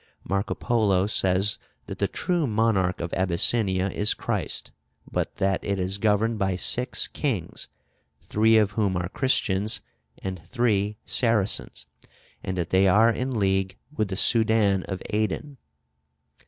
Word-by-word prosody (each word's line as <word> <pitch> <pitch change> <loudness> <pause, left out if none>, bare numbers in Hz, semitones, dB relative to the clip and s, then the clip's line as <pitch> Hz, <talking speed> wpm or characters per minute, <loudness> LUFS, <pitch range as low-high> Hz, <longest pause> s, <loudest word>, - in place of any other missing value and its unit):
Marco 100 +2 -2
Polo 105 -6 +1
says 95 0 +1 0.3
that - - -8
the - - +2
true 175 -4 -1
monarch 105 -5 +1
of 85 - -4
Abyssinia 95 +1 +1
is 105 +1 +1
Christ; - - -3 0.4
but - - -2
that 95 -1 0
it 100 -1 -1
is 95 +2 -1
governed 110 +2 +1
by 95 -2 0
six 125 +7 0
kings, 110 - -3 0.5
three 110 +1 +3
of 105 -2 +3
whom 100 -3 0
are 90 0 -3
Christians 105 -3 +1 0.4
and 95 -2 -6
three 105 0 0
Saracens, 115 -5 0 0.6
and 95 0 -4
that 85 -1 -3
they 95 +1 +4
are 110 +5 +5
in 125 +3 -2
league 95 -2 0 0.2
with 110 - 0
the 95 - -4
Soudan 110 -3 +3
of 95 -2 -5
Aden. 110 +7 -2
100 Hz, 140 wpm, -25 LUFS, 95-110 Hz, 0.6 s, are